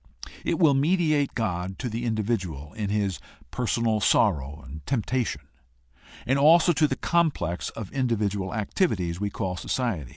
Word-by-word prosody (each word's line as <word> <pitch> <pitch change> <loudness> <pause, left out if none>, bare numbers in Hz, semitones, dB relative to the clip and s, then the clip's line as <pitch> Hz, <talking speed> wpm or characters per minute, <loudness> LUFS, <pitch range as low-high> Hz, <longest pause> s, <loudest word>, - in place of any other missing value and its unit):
It - - 0
will 160 -5 +5
mediate 150 -1 +2
God 95 -4 -2
to 130 - -4
the 115 +1 -3
individual 100 -10 -2
in 105 -2 -3
his 100 -3 -1 0.3
personal 115 -2 0
sorrow 75 - +2
and 75 +2 -9
temptation, 115 - -1 0.8
and 130 +5 +2
also 165 +4 +6
to 155 0 +3
the - - -2
complex 150 - 0
of 110 -4 -8
individual 105 -7 0
activi 110 - 0
ties 85 -1 -3
we 105 0 -1
call 95 -2 -3
society. 105 - -2
110 Hz, 150 wpm, -26 LUFS, 95-130 Hz, 0.8 s, also